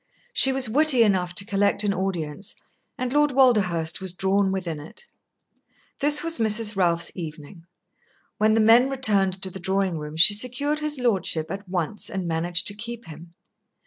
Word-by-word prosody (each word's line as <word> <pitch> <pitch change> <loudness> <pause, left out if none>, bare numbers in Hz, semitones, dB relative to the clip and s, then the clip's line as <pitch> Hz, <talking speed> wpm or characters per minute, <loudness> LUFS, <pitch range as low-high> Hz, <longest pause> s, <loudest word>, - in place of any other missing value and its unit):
She 265 - +3
was 265 -2 +2
witty 265 +1 +4
enough 180 -4 0
to 200 - -1
collect 205 0 +1
an 205 -1 0
audience, 185 -2 -4 0.4
and 255 0 -3
Lord 295 0 +3
Walderhurst 190 -11 +2
was 190 -2 -1
drawn 195 +1 +1
within 175 -5 -4
it. 165 - -10 0.9
This 295 +3 +4
was 330 -5 0
Mrs. 220 -1 +1
Ralph's 170 -3 +1
evening. 165 0 -9 0.7
When 215 +1 +3
the 225 - +3
men 235 +4 +5
returned 200 -8 0
to 190 - -3
the 190 - -9
drawing 190 -2 -1
room, 150 +1 -8
she 170 +5 +7
secured 255 +7 -2
his 300 -1 -1
lordship 190 -9 -1
at 195 0 -7
once 180 +2 -3
and 190 -2 -4
managed 170 +1 -1
to - - -5
keep 230 +3 -7
him. 165 +1 -13
195 Hz, 170 wpm, -23 LUFS, 175-235 Hz, 0.9 s, she